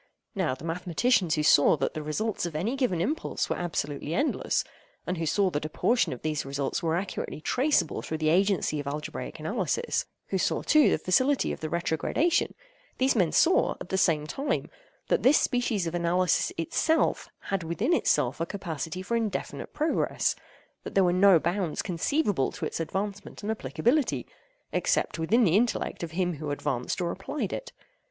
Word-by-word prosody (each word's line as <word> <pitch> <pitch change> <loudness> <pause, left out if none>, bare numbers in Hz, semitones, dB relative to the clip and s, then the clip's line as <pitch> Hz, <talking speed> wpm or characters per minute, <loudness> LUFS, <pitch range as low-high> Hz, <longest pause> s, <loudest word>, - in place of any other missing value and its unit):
Now 185 - 0
the 135 - -10
mathematicians 175 +3 +1
who 150 - 0
saw 150 0 +5
that 135 - -1
the 155 - -4
results 175 +6 -2
of 165 - -8
any 205 - -1
given 250 -11 0
impulse 300 - -1
were - - +1
absolutely 155 -3 -3
endless—and 295 - -2
who 165 - -1
saw 195 +3 +2
that 145 -2 -2
a 155 - -3
portion 235 +9 +1
of 125 - -7
these 155 -1 -1
results 140 0 -2
were 165 -1 0
accurately 185 -3 -4
traceable 250 - +1
through 160 - -4
the 155 0 +1
agency 185 -3 +2
of 145 - -5
algebraic 150 +2 -5
analysis—who 475 0 -2
saw, - - 0
too, 305 -1 +5
the - - +2
facility 260 +10 +2
of - - -5
the 155 - -4
retrogradation—these 315 - -1
men 180 -7 +2
saw, 360 - +3
at - - -8
the - - -1
same 155 -4 +2
time, 275 - -2 0.4
that - - +2
this 270 +4 +6
species 240 -7 0
of 165 - -3
analysis 175 +1 +1
itself, 315 - +1 0.2
had 195 -1 +1
within 170 - 0
itself 135 - +1
a - - +1
capacity 175 -2 -5
for 235 +5 -1
indefinite 220 -4 -3
progress—that 310 +2 -3
there 195 - +5
were 175 -1 +3
no 190 0 +6
bounds 175 +1 -1
conceivable 195 - 0
to - - -5
its - - -4
advancement 200 +5 -4
and 215 - -1
applicability, 220 - 0 0.5
except - - 0
within 220 +10 +3
the 175 -4 +3
intellect 235 +3 0
of 170 - -3
him 175 -2 -1
who 150 0 -5
advanced 145 +1 -2
or 170 -1 0
applied 215 +2 -4
it. - - -5
180 Hz, 170 wpm, -27 LUFS, 160-235 Hz, 0.5 s, this